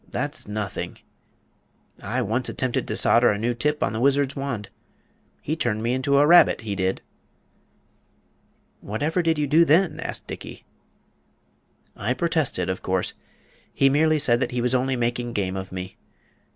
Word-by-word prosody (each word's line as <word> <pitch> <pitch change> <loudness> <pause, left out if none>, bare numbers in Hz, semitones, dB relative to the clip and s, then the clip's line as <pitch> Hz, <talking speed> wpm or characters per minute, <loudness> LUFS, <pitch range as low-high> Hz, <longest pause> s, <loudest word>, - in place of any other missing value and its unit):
"That's - - -4
nothing! 105 -1 -4 1.0
I 125 +5 -2
once 115 +4 -1
attempted 130 -2 -2
to - - -2
solder 120 +1 +4
a 105 - 0
new 120 +3 -1
tip 150 +5 0
on 100 - -1
the 110 - -3
Wizard's 140 +1 +2
wand. 130 -8 -4 0.7
He 155 - -1
turned 120 -8 -1
me 120 +2 0
into 135 +2 +1
a 145 - +5
rabbit, 175 +3 +6
he 105 -2 -4
did." 95 0 -1 1.8
"Whatever 150 - -1
did 165 -2 +1
you 150 - +1
do 155 +4 +5
then?" 165 0 +3
asked - - -5
Dickey. - - -9 1.3
"I 125 +5 -2
protested, 155 - 0
of 95 - -3
course. 95 -1 -1 0.6
He 135 0 +3
merely 155 +2 +3
said 120 -5 +2
that 130 - -1
he 125 - -3
was 125 +1 0
only 130 +1 +1
making 120 0 -2
game 95 -3 -2
of 95 0 -6
me. 95 0 -7
125 Hz, 160 wpm, -24 LUFS, 105-145 Hz, 1.8 s, rabbit